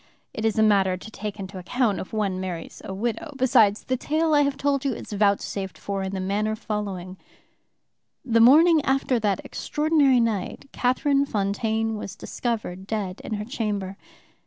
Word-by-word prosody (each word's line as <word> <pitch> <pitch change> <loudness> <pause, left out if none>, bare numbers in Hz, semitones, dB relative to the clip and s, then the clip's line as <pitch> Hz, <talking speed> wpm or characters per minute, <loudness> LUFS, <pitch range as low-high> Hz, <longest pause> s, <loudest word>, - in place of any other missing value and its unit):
It 220 - -3
is 220 -1 +1
a 220 - +5
matter 195 -3 +3
to 215 +4 -11
take 210 -1 -6
into 190 0 -6
account 205 +1 0
if - - -7
one 200 -4 -1
marries 180 -3 -6
a - - -6
widow. 235 +9 -3
Besides, 240 -6 +4
the 255 - -1
tale 310 +4 0
I 295 - +5
have 280 -1 0
told 280 -1 0
you 275 -2 0
is - - -9
vouchsafed 200 -1 0
for 200 -1 -3
in 190 0 -3
the - - -2
manner 205 +3 -1
following: 200 -4 -4 1.1
"The 230 -2 +3
morning 310 +6 +7
after 265 -2 +1
that 205 -3 -1
extraordinary 295 -4 +2
night 225 0 -1
Catherine 275 +3 +1
Fontaine 220 +1 -1
was 195 -2 -6
discovered 215 -6 -4
dead 205 -4 -3
in 215 - -3
her 210 0 -4
chamber. 205 -5 -3
215 Hz, 170 wpm, -25 LUFS, 195-255 Hz, 1.1 s, morning